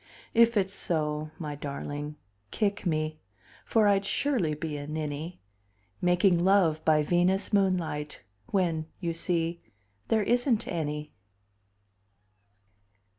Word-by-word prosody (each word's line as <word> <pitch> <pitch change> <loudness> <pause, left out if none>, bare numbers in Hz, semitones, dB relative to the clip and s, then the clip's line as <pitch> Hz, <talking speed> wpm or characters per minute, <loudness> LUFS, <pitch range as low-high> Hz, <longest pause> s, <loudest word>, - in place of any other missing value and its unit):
If 235 -1 +5
it's 190 -1 +1
so, 155 -4 -1
my 150 -3 -4
darling, 145 +1 -5 0.3
kick 200 - -1
me, 155 -1 -1 0.4
For 220 -2 +3
I'd 200 -1 +3
surely 200 - +1
be 150 0 -4
a 145 0 -6
ninny, 155 +2 -4 0.6
Making 180 0 +3
love 180 -5 +3
by 155 -1 +4
Venus 180 +6 +1
moonlight 175 -7 0 0.2
When 165 -5 0
you 170 -3 -2
see 170 0 -1 0.5
there 220 -2 +2
isn't 240 0 +2
any! 150 -2 -3
170 Hz, 110 wpm, -28 LUFS, 150-195 Hz, 0.6 s, If